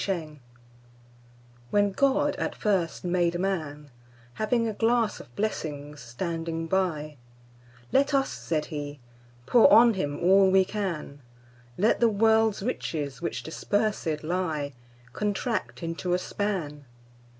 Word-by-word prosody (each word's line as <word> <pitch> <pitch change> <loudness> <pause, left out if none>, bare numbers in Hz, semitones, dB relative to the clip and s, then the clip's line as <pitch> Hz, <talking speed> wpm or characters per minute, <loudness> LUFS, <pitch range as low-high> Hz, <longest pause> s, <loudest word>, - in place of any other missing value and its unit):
The - - -4
Pulley 155 -4 -9 1.3
WHEN 205 +4 +2
God 280 +6 +2
at - - -2
first 190 -6 0
made 175 -1 +1
Man, 155 -6 -3 0.4
Having 230 - 0
a 220 - -2
glass 225 0 +1
of 120 - -14
blessings 150 -8 -3
standing 165 +6 -4
by—Let 125 - -3
us 270 -1 +1
(said 155 -2 -2
He) 145 -1 -5 0.5
pour 235 - +6
on 235 0 +7
him 145 -7 -3
all 190 +2 +5
we 190 0 +5
can; 180 -8 -4 0.6
Let 215 +4 +3
the 235 - +5
world's 220 -1 +3
riches, 150 - -3
which 170 - -3
dispersèd 185 -3 -1
lie, 155 -4 -2 0.4
Contract 210 -1 -2
into 165 +2 -1
a - - +2
span. 180 -7 -3
175 Hz, 120 wpm, -27 LUFS, 150-210 Hz, 1.3 s, on